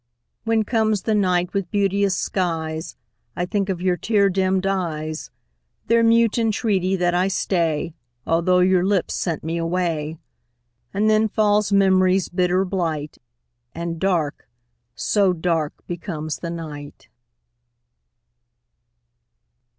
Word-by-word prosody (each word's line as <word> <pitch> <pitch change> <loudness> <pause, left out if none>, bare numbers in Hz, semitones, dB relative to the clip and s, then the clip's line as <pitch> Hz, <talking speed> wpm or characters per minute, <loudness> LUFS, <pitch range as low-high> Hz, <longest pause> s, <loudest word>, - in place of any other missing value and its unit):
When 225 -1 +2
comes 220 -2 0
the 220 - 0
night 180 -3 +1
with 195 -3 -2
beauteous 200 -1 +1
skies, 160 -3 -2 0.4
I 175 - -1
think 200 +1 -1
of 180 -2 -3
your 180 -1 +2
tear 205 -2 +2
dimmed 190 0 +1
eyes, 160 -5 -2 0.6
Their 230 +1 +3
mute 230 0 +3
entreaty 205 -4 +1
that 175 -1 +1
I 180 +2 +2
stay, 165 -5 -1 0.3
Although 170 +2 +2
your 185 -1 +3
lips 195 -2 0
sent 165 -4 -2
me 165 +2 -2
away; 165 -2 -2 0.7
And 205 +2 +1
then 215 0 +4
falls 210 -1 +2
memory's 190 -1 +3
bitter 180 +1 +1
blight, 165 -6 -3 0.6
And 170 0 -4
dark 170 -6 -1 0.5
so 200 -3 +2
dark 165 -3 -1
becomes 165 -3 -5
the 170 - -5
night. 150 -4 -8
185 Hz, 120 wpm, -22 LUFS, 165-200 Hz, 0.7 s, then